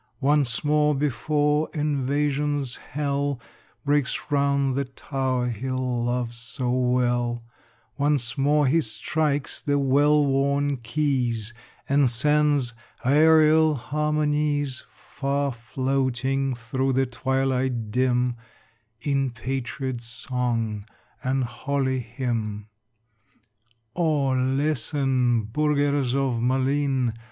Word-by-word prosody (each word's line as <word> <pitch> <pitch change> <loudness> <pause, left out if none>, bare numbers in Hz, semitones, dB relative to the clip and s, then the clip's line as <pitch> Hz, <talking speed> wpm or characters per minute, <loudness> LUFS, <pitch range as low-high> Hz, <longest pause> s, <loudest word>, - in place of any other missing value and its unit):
Once 140 -3 +2
more, 150 0 +3
before 150 +2 +1
invasion's 145 -1 0
hell 140 -1 -2 0.5
Breaks 145 -1 0
round 140 -1 +2
the 140 +1 -1
tower 130 -1 -2
he 120 +3 -4
loves 125 -2 -1
so 120 +2 -3
well, 120 -1 +1 0.6
Once 140 -5 +1
more 145 +2 +3
he 160 +5 +3
strikes 145 +3 -2
the 145 -1 +1
well 145 +2 +3
worn 140 +1 +1
keys, 120 -3 -1 0.3
And 140 -1 +3
sends 145 0 +2 0.3
aërial 155 +2 +5
harmonies 150 0 0
Far 140 0 -2
floating 130 +2 -1
through 130 +3 -1
the 135 +1 +2
twilight 130 -3 -1
dim 125 0 +1 0.6
In 135 -1 0
patriot 130 +1 -4
song 115 -3 -2 0.4
and 130 +1 0
holy 130 +2 -1
hymn. 115 -3 -4 1.3
O 155 -5 +1
listen, 130 -2 +1
burghers 145 +1 +1
of 130 -4 0
Malines! 130 0 +1
135 Hz, 90 wpm, -25 LUFS, 125-145 Hz, 1.3 s, aërial